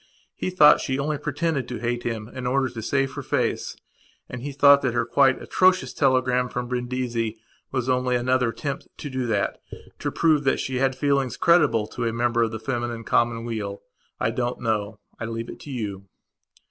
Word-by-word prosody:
He - - -2
thought 180 -5 +6
she 130 -1 -1
only 145 +1 -1
pretended 150 -3 -1
to 125 - -5
hate 120 0 -2
him 115 -3 -4
in 125 +1 -6
order 130 +1 +1
to 115 -2 -7
save 135 +3 0
her 145 - -5
face - - -1 0.5
and 125 - -7
he 145 +3 -4
thought 140 0 +6
that 130 -3 -1
her 120 0 +1
quite 130 +2 +3
atrocious 185 0 +2
telegram 130 -2 +2
from 125 0 -4
Brindisi 120 -2 -2 0.3
was 130 -2 -2
only 125 -1 +1
another 125 0 +2
attempt 140 +3 -5
to 145 - -6
do 130 -2 -2
thatto 105 -4 -3
prove 155 -3 +2
that 135 - +2
she 130 -1 -2
had 130 0 +1
feelings 135 -2 0
creditable 150 -10 +4
to 120 - -4
a 115 - -1
member 120 0 +1
of 115 - +2
the 110 0 -6
feminine 120 0 -3
commonweal. 115 -4 -1 0.4
I 110 - +1
don't 120 +1 -2
know. 110 -2 -1 0.2
I 110 - -3
leave 115 +1 -5
it - - -11
to - - -11
you. 100 -7 -5
125 Hz, 185 wpm, -24 LUFS, 115-135 Hz, 0.5 s, thought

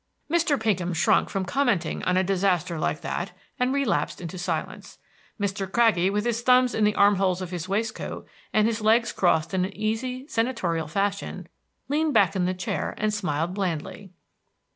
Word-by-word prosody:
Mr. 330 -5 +2
Pinkham 190 -5 0
shrunk 170 +2 +3
from 195 -1 -2
commenting 230 - 0
on 180 0 +2
a 185 - +3
disaster 180 -3 0
like - - -1
that, - - -4 0.3
and 250 +1 +2
relapsed 275 -5 0
into 175 +1 -7
silence. 175 - -4 0.4
Mr. 195 -1 -2
Craggie, 220 -6 +3
with 205 +2 -1
his 235 -1 0
thumbs 250 0 +4
in 215 - +2
the 210 - +2
arm 200 0 +5
holes 185 -2 +1
of 185 -2 -6
his 180 0 -5
waistcoat, 220 +3 -3 0.2
and 215 0 +3
his 225 0 0
legs 225 +1 +3
crossed 165 -3 +1
in 185 -1 +1
an 195 +2 -5
easy, 245 +5 -2
senatorial 190 - -1
fashion, 200 +4 -2 0.4
leaned 300 0 0
back 200 -3 +4
in 180 -2 +1
the 185 - 0
chair 180 - -3
and 215 0 0
smiled 175 -4 -1
blandly. 190 0 -4
200 Hz, 175 wpm, -25 LUFS, 180-230 Hz, 0.4 s, arm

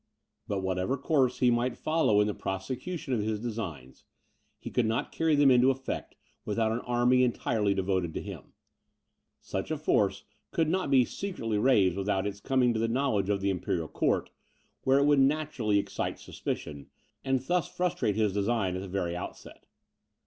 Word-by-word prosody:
But 100 -2 -2
whatever 95 +8 -1
course 135 -2 +1
he 125 -1 +5
might 120 +1 0
follow 155 -10 +2
in - - +3
the 105 - -1
prosecution 130 - -4
of 120 - +1
his 105 0 -2
designs, 95 - -6 0.5
he - - -8
could 120 -3 +1
not 115 +1 -1
carry 160 -2 +2
them 145 -2 +5
into 125 +1 +5
effect 135 0 -3 0.3
without 110 +1 0
an 115 - -1
army 125 +1 +3
entirely 110 -4 +1
devoted 95 -3 0
to - - -2
him. - - -9 0.9
Such 95 - -4
a 155 - -1
force 100 -9 +1 0.3
could 165 -2 +1
not 180 -1 0
be 130 -3 +5
secretly 115 - -3
raised 100 -7 +3
without 100 0 0
its 100 0 -4
coming 125 +1 +2
to 110 - -1
the 115 - +1
knowledge 115 -5 0
of 100 -1 +1
the 100 0 +1
imperial 90 -3 -2
court, - - 0 0.5
where 135 +1 +5
it 140 - +4
would 145 -1 +4
naturally 135 -6 +1
excite 100 - -2
suspicion, 70 -2 -6 0.4
and 135 -1 +1
thus 175 +6 0
frustrate 175 - -1
his 105 -3 +1
design 100 -2 0
in 95 - -3
the 100 - -6
very 90 -2 -2
outset. 90 - -9
115 Hz, 175 wpm, -29 LUFS, 100-135 Hz, 0.9 s, he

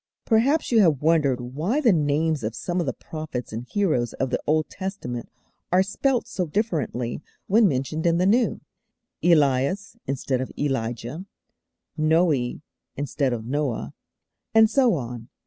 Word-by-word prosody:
Perhaps 255 +8 +2
you 230 - +5
have 160 -9 +3
wondered 150 -6 +3
why 150 - -2
the 240 -9 +4
names 155 -1 +1
of 110 +2 -3
some 175 +11 -2
of 170 - -1
the - - +1
prophets 155 -8 -6
and 115 +3 -5
heroes 155 - 0
of 135 -1 -2
the - - 0
Old 155 0 +2
Testament 185 - -5 0.4
are 185 +1 +5
spelt 240 +5 0
so 180 -7 -2
differently 150 - -2 0.2
when 215 +2 +5
mentioned 155 +3 -1
in 170 0 +3
the 180 - +2
New 230 +5 +2 0.6
'Elias' 155 - +2
instead 135 -1 -1
of 130 - -5
'Elijah,' 130 - -3 0.7
'Noe' 155 -5 +2 0.3
instead 140 -1 -1
of 115 -2 -3
'Noah,' 125 - -2 0.6
and 220 0 +8
so 255 -7 +4
on. 120 -4 -6
155 Hz, 145 wpm, -24 LUFS, 130-190 Hz, 0.7 s, and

